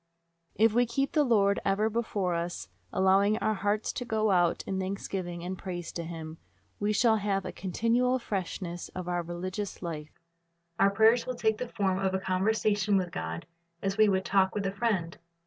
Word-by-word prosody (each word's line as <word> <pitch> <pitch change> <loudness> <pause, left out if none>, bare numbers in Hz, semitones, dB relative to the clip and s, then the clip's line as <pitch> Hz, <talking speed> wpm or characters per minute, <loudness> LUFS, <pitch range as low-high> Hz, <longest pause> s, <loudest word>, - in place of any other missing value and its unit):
If 220 0 +4
we 245 +1 +3
keep 275 +4 0
the 300 - +3
Lord 200 -6 +3
ever 200 +2 +2
before 210 -5 -1
us, 170 +1 -3 0.2
allowing 195 +3 +3
our 215 -1 +1
hearts 205 +1 -1
to - - -3
go 220 -3 +1
out 175 -2 +2
in 190 -1 -2
thanksgiving 185 -2 -4
and 185 +2 -3
praise 175 -2 -6
to 170 - -4
Him, 160 -1 -7 0.4
we 205 +1 +1
shall 220 +1 +4
have 200 -2 -1
a - - -4
continual 230 +7 +1
freshness 185 -5 -4
in 185 -1 -5
our 175 0 0
religious 185 +4 -5
life. 155 -3 -6 0.6
Our 195 - +6
prayers 225 +4 +4
will 255 - -2
take 220 -2 +1
the 250 - -4
form 190 -4 0
of 190 -1 0
a - - 0
conversation 205 +2 +1
with 180 -2 -1
God, 80 - -4 0.4
as 195 0 0
we 215 -1 +6
would 190 -1 +1
talk 190 -1 +2
with 205 -1 -1
a 195 - 0
friend. 195 -5 -1
195 Hz, 185 wpm, -29 LUFS, 180-220 Hz, 0.6 s, Our